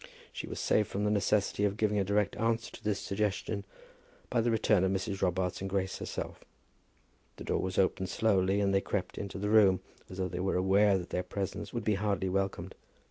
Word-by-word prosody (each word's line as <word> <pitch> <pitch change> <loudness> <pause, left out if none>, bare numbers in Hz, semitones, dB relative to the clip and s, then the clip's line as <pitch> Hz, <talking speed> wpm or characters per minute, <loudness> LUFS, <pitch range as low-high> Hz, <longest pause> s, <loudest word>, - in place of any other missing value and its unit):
She - - -5
was - - -5
saved 105 -2 +2
from 100 - -2
the 105 - +2
necessity 100 0 +1
of 100 0 +1
giving 105 -1 +1
a - - +2
direct 100 +1 +1
answer 115 0 0
to 115 - -12
this 105 -1 0
suggestion 100 0 -2 0.7
by 120 - +3
the 120 - +1
return 110 -4 +3
of 95 - +2
Mrs. 95 0 -2
Robarts 90 0 0
and 95 - -3
Grace 95 -1 -1
herself. - - -5 0.9
The - - -9
door - - 0
was 95 -1 -3
opened 95 0 +1
slowly, 100 -2 +2
and 100 -1 +2
they 95 - +3
crept 95 -1 -3
into 100 -1 -5
the 105 +2 -1
room 100 -4 +6 0.3
as 95 - -9
though 95 -1 0
they 90 0 -5
were 95 +1 0
aware 95 +2 +4
that 90 -1 -7
their 90 - 0
presence 100 +2 -4
would 120 -2 -3
be 105 - +2
hardly 100 -3 0
welcomed. 95 +1 -2
100 Hz, 210 wpm, -31 LUFS, 95-105 Hz, 0.9 s, room